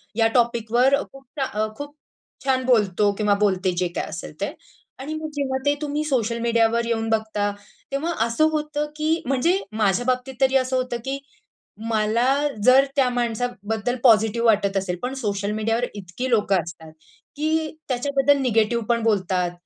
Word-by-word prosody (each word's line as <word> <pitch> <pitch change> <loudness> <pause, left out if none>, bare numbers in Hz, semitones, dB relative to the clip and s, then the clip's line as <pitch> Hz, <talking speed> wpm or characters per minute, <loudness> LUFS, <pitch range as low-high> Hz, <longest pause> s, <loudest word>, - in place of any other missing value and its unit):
या 225 0 +4
टॉपिकवर 240 +2 +3 0.2
खूप 270 0 -14 0.2
चा - - +2 0.2
अ, - - 0
खूप 290 0 -8 0.5
छान 260 -1 +1
बोलतो 210 -5 +3
किंवा 210 -1 +2
बोलते 190 -2 +1
जे 180 0 +1
काही - - -2
असेल - - -7
ते. - - -2 0.5
आणि 280 +4 -5
मग 310 0 -4
जेव्हा 275 -2 -1
ते 285 - +4
तुम्ही 300 0 -2
सोशल 235 -5 0
मीडियावर 230 0 +2
येऊन 225 -1 -1
बघता, 220 -2 0 0.4
तेव्हा 305 +5 -1
असं 235 +7 +2
होतं 300 -1 -2
की 315 +2 0
म्हणजे 275 +9 +2
माझ्या 215 +1 +1
बाबतीत 255 +1 -1
तरी 265 0 +3
असं 260 0 0
होत, 255 -1 -2
की 270 +1 -2 0.7
मला 220 +2 +1 0.4
जर 260 +3 +6
त्या 270 -3 +3
माणसाबद्दल 240 -2 -2
पॉझिटिव्ह 225 -1 +4
वाटत 200 -3 +2
असेल 185 -2 -2
पण 250 +2 -3
सोशल 205 -2 -2
मीडियावर 225 +3 0
इतकी 205 +6 -5
लोकं 205 -5 +2
असतात, 165 -2 -10 0.4
की 315 +1 0 0.2
त्याच्याबद्दल 275 +2 +2
निगेटिव्ह 235 -2 +1
पण 235 -1 +2
बोलतात 185 -5 +1
235 Hz, 160 wpm, -23 LUFS, 215-270 Hz, 0.7 s, जर